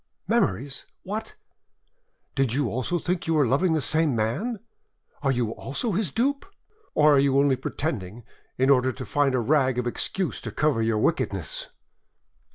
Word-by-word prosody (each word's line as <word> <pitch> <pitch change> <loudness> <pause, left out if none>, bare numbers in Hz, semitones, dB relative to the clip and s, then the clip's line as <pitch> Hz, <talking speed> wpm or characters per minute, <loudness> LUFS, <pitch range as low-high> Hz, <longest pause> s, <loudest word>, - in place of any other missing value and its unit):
"Memories? 135 +9 0 0.2
What! 215 +3 -5 1.0
did 135 -4 +1
you 135 -3 +1
also 130 - -1
think 175 +1 -2
you 165 - +2
were 150 -3 +4
loving 155 +8 +2
the 155 -3 0
same 155 -2 +1
man? 150 - -1 0.6
Are 140 -2 +2
you 120 -4 0
also 145 - -3
his 195 -1 0
dupe? 275 - 0 0.5
Or 150 0 +6
are 140 - +5
you 135 0 +3
only 140 -1 +4
pretending, 120 - -4 0.3
in 130 +2 +4
order 130 -1 +4
to 130 +1 -7
find 140 -2 +1
a - - +2
rag 130 0 +2
of 125 - 0
excuse 175 +9 -2
to - - -5
cover 150 -6 +1
your 110 -1 +1
wickedness?" - - -1
140 Hz, 165 wpm, -25 LUFS, 125-160 Hz, 1.0 s, Or